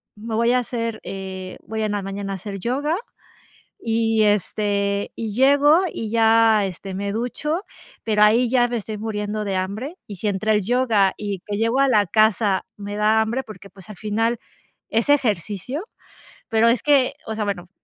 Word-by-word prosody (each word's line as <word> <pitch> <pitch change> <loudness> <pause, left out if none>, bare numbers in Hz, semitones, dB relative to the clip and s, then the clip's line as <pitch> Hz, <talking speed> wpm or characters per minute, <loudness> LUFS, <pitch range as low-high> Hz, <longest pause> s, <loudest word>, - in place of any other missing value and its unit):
me 220 +1 -5
voy 235 +2 +3
a 250 - +4
hacer, 230 -2 -3
eh 190 -1 -6
voy 220 0 -3
en 215 - -1
la 205 - -1
mañana 195 0 -5
a - - -3
hacer 195 +1 -7
yoga, 280 - -1 0.9
y, 225 -1 +2
este, 200 0 0
y 225 -2 -4
llego, 285 +5 +5
y 220 - -4
ya, 225 -2 +4
este, 190 0 -6
me 200 +1 -3
ducho, 300 - -2 0.4
pero 210 -2 +2
ahí 230 +4 +5
ya 245 0 +3
me 240 - -2
estoy 215 0 -5
muriendo 210 -1 -3
de 195 -2 -2
hambre. 215 - -4
Y 205 - -8
si 210 +4 -2
entre 210 +2 0
el 210 -1 +2
yoga, 225 -3 +2
y 200 -3 -4
que 205 -1 -3
llego 230 +4 +1
a 275 - +4
la 210 -6 +3
casa 215 -1 +2
me 205 0 -6
da 215 +1 +3
hambre, 235 +4 -1
porque, 200 -2 -12
pues, 190 +1 -14
al 210 - -9
final, 225 +4 -1 0.5
es 225 +4 0
ejercicio, 220 - 0 0.7
pero 225 -1 +3
es 235 -1 +2
que, 280 -4 +4
o 220 - -3
sea, 215 - -2
bueno, 180 -3 -4
215 Hz, 185 wpm, -22 LUFS, 200-235 Hz, 0.9 s, llego